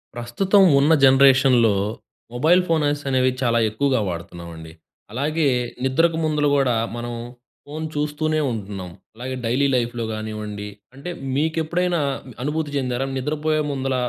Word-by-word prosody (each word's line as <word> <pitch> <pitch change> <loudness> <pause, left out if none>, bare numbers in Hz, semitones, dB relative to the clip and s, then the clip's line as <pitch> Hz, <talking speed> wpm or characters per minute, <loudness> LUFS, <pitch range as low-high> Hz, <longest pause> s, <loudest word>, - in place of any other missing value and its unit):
ప్రస్తుతం 185 - +2 0.2
ఉన్న 145 +4 +4
జనరేషన్‍లో 130 -4 +5 0.6
మొబైల్ 160 +9 +4
ఫోన్స 150 -3 +1
అనేవి 130 -1 +2
చాలా 120 -2 +2
ఎక్కువగా 130 +4 0
వాడుతున్నామండి. 85 -2 -7 0.4
అలాగే 150 +6 -1 0.4
నిద్రకు 160 +5 +2
ముందుల 150 -1 +1
గూడా 135 -3 +2 0.2
మనం 120 0 -5 0.5
ఫోన్ 155 +2 -6
చూస్తూనే 150 +1 -1
ఉంటున్నాం. 100 -4 -6 0.3
అలాగే 130 +3 -5
డైలీ 130 +5 +2
లైఫ్‌లో 120 -1 -1
కానివ్వండి, 105 -1 -5 0.3
అంటే 140 +6 -7 0.3
మీకెప్పుడైనా 165 +3 0 0.4
అనుభూతి 150 +1 -2
చెందారా? 130 -1 -1
నిద్రపోయే 155 +3 -1
ముందుల 135 -1 -2
135 Hz, 115 wpm, -22 LUFS, 120-155 Hz, 0.6 s, జనరేషన్‍లో